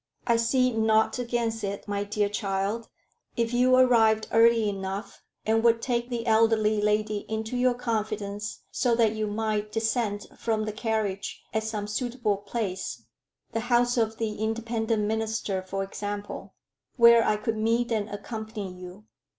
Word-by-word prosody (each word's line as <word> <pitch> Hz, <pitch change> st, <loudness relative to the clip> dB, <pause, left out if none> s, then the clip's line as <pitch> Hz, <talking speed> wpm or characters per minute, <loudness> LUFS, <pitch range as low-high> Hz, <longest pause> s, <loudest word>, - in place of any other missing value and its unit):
"I 235 Hz, -1 st, +3 dB
see 255 Hz, +2 st, +2 dB
naught 220 Hz, +1 st, +2 dB
against 235 Hz, -2 st, -1 dB
it, 200 Hz, +1 st, -4 dB
my 205 Hz, 0 st, -1 dB
dear 205 Hz, 0 st, 0 dB
child, 200 Hz, +2 st, -2 dB, 0.5 s
if 230 Hz, 0 st, 0 dB
you 250 Hz, +1 st, +4 dB
arrived 225 Hz, -4 st, +4 dB
early 230 Hz, -1 st, +5 dB
enough, 195 Hz, +1 st, -5 dB, 0.2 s
and 225 Hz, +1 st, +2 dB
would 230 Hz, -1 st, +4 dB
take 240 Hz, 0 st, -1 dB
the 235 Hz, -2 st, -3 dB
elderly 220 Hz, -2 st, +3 dB
lady 210 Hz, 0 st, +1 dB
into 220 Hz, +2 st, -3 dB
your 250 Hz, 0 st, +2 dB
confidence, 215 Hz, -3 st, -3 dB
so 240 Hz, -2 st, +1 dB
that 230 Hz, -2 st, +3 dB
you 215 Hz, -1 st, -2 dB
might 215 Hz, 0 st, -2 dB
descend 220 Hz, -2 st, -1 dB
from 220 Hz, -2 st, 0 dB
the 215 Hz, -, -2 dB
carriage 215 Hz, -3 st, -2 dB
at 220 Hz, -, +1 dB
some 215 Hz, -2 st, -3 dB
suitable 235 Hz, -1 st, -1 dB
place 195 Hz, -, -4 dB, 0.5 s
the 225 Hz, -, -1 dB
house 245 Hz, 0 st, +3 dB
of 225 Hz, -2 st, 0 dB
the 220 Hz, -2 st, -2 dB
Independent 225 Hz, 0 st, -1 dB
minister, 220 Hz, -2 st, -1 dB
for 195 Hz, +1 st, -3 dB
example 205 Hz, +1 st, -6 dB, 0.4 s
where 235 Hz, -1 st, +7 dB
I 215 Hz, -, +2 dB
could 220 Hz, +1 st, -2 dB
meet 230 Hz, +2 st, +1 dB
and 215 Hz, -2 st, 0 dB
accompany 215 Hz, -2 st, -6 dB
you. 180 Hz, +3 st, -11 dB
220 Hz, 150 wpm, -27 LUFS, 210-230 Hz, 0.5 s, where